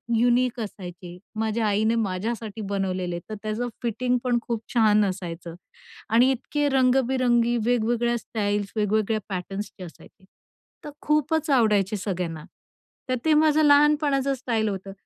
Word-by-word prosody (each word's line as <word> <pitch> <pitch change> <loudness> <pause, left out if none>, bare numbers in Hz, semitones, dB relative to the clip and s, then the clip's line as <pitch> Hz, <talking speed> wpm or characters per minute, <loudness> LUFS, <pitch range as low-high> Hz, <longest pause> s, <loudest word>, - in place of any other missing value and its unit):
Unique 245 +1 +2
असायचे. 180 -4 -8 0.2
माझ्या 220 0 0
आईने 220 +3 +2
माझ्यासाठी 215 +3 -4
बनवलेले. 185 -3 -2
तर 215 - -4
त्याचं 215 +3 -2
फिटिंग 250 +2 0
पण 245 -1 +1
खूप 230 -2 -3
छान 215 -3 +4
असायचं 175 -3 -5 0.5
आणि 240 +4 +5
इतके 290 +3 -1
रंग-बिरंगी 255 -2 +2
वेगवेगळ्या 240 0 +1
स्टाईल्स, 205 -2 -2
वेगवेगळ्या 215 +1 +1
पॅटर्न्सचे 195 +1 -5
असायचे. 180 +2 -14 0.6
तर - - -7
खूपच 305 +1 +1
आवडायचे 215 -6 +3
सगळ्यांना, 180 -5 -4 0.7
तर 255 - +2
ते 315 - +4
माझं 310 0 +4
लहानपणाचं 290 -2 +4
स्टाईल 230 -4 -1
होतं. 195 0 -6
225 Hz, 125 wpm, -25 LUFS, 200-255 Hz, 0.7 s, आणि